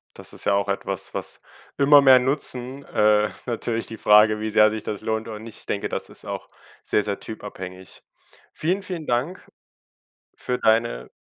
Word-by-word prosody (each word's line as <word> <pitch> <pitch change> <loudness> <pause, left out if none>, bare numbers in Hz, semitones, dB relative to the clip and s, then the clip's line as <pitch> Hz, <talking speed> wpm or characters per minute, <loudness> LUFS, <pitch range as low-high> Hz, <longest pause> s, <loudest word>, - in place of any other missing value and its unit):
Das - - -11
ist - - -9
ja 100 - +3
auch 100 0 +1
etwas, 100 0 -4
was - - -6 0.4
immer 145 +1 +7
mehr 130 -2 +7
nutzen. 130 0 -2
Äh, 105 0 +3 0.2
natürlich 115 -1 -3
die 115 - -8
Frage, 105 +1 +5
wie 110 - -2
sehr 110 0 +5
sich 110 -1 -5
das 105 - -4
lohnt 110 0 -2
oder 110 -2 -6
nicht. 110 0 -10
Ich - - -12
denke, - - -2
das - - -4
ist - - -14
auch - - -6 0.3
sehr, 105 - +1
sehr 100 -1 -3
typabhängig. 95 -4 -9 0.5
Vielen, 185 +5 -1
vielen 175 -5 -5
Dank 130 +10 -2 0.9
für 125 - -3
deine 110 - +1
110 Hz, 175 wpm, -23 LUFS, 105-130 Hz, 0.9 s, immer